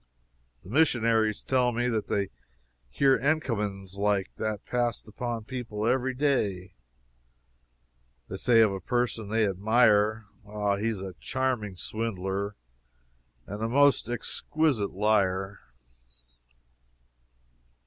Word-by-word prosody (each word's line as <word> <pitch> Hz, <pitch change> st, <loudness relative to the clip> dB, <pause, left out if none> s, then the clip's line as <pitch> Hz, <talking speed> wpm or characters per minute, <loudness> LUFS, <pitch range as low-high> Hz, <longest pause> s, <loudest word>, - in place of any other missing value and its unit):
The -, -, -13 dB
Missionaries 115 Hz, -7 st, +2 dB
tell 125 Hz, -2 st, +2 dB
me 120 Hz, +1 st, 0 dB
that 110 Hz, -4 st, -1 dB
they 100 Hz, -2 st, -1 dB, 0.6 s
hear 135 Hz, -, +3 dB
encomiums 105 Hz, -, -1 dB
like 100 Hz, -1 st, 0 dB
that 110 Hz, -1 st, -3 dB
passed 120 Hz, -1 st, -1 dB
upon 115 Hz, +1 st, -4 dB
people 115 Hz, -3 st, -5 dB
every 130 Hz, +2 st, +1 dB
day. 105 Hz, -10 st, 0 dB, 1.5 s
They 95 Hz, -, -6 dB
say 115 Hz, +2 st, +4 dB
of 110 Hz, -2 st, +4 dB
a 95 Hz, -, -4 dB
person 120 Hz, 0 st, -1 dB
they 110 Hz, 0 st, +2 dB
admire, 110 Hz, +2 st, +3 dB, 0.2 s
"Ah, 105 Hz, -1 st, -1 dB
he 105 Hz, +3 st, -1 dB
is 110 Hz, -4 st, -2 dB
a 95 Hz, -1 st, -6 dB
charming 125 Hz, -7 st, -2 dB
swindler, 100 Hz, -1 st, -3 dB, 0.9 s
and 105 Hz, +2 st, -7 dB
a 110 Hz, -, -1 dB
most 140 Hz, -2 st, +4 dB
exquisite 120 Hz, -1 st, 0 dB
liar!" 95 Hz, -1 st, +1 dB
110 Hz, 110 wpm, -28 LUFS, 100-125 Hz, 1.5 s, say